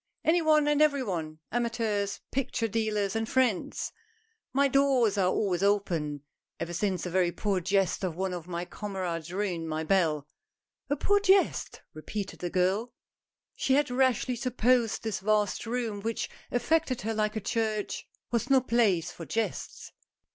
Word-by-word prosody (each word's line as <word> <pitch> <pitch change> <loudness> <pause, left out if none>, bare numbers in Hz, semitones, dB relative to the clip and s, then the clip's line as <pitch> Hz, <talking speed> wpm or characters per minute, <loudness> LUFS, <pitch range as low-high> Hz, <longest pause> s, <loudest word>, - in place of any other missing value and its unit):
"Any 335 +2 +4
one 305 -2 +4
and 295 0 +3
every 285 -3 +4
one 160 -7 -3
— - - -51
amateurs, 225 -4 -1
picture 245 -3 -1
dealers, 210 -2 -1
and 225 0 -1
friends. 250 -8 0 0.6
My 280 +1 +3
doors 265 -6 +3
are 190 -3 +3
always 185 -3 0
open 170 -8 0 0.4
ever 175 - -4
since 185 +1 -1
a 180 - -4
very 180 -1 +2
poor 195 +2 0
jest 195 +1 +1
of 180 -4 -1
one 190 +1 -2
of 175 -1 -6
my 175 0 -3
comrades 180 -5 -4
ruined 180 -4 -2
my 155 0 -2
bell." 155 -5 +1 0.6
"A 285 - +2
poor 405 +8 +3
jest?" 390 -1 +2
repeated 195 +6 -5
the 175 - -3
girl. 190 +6 +1 0.6
She 265 - +2
had 290 -2 +2
rashly 255 -1 +2
supposed 245 -2 +1
this 215 -4 -2
vast 210 +2 +1
room, 230 -4 -2
which 225 +2 -3 0.2
affected 255 +1 +1
her 225 +1 -1
like 215 0 0
a - - 0
church, 215 0 -2 0.2
was 235 +1 0
no 270 -1 +6
place 225 -9 +2
for 165 - -9
jests. 225 0 -3
210 Hz, 160 wpm, -29 LUFS, 185-245 Hz, 0.6 s, no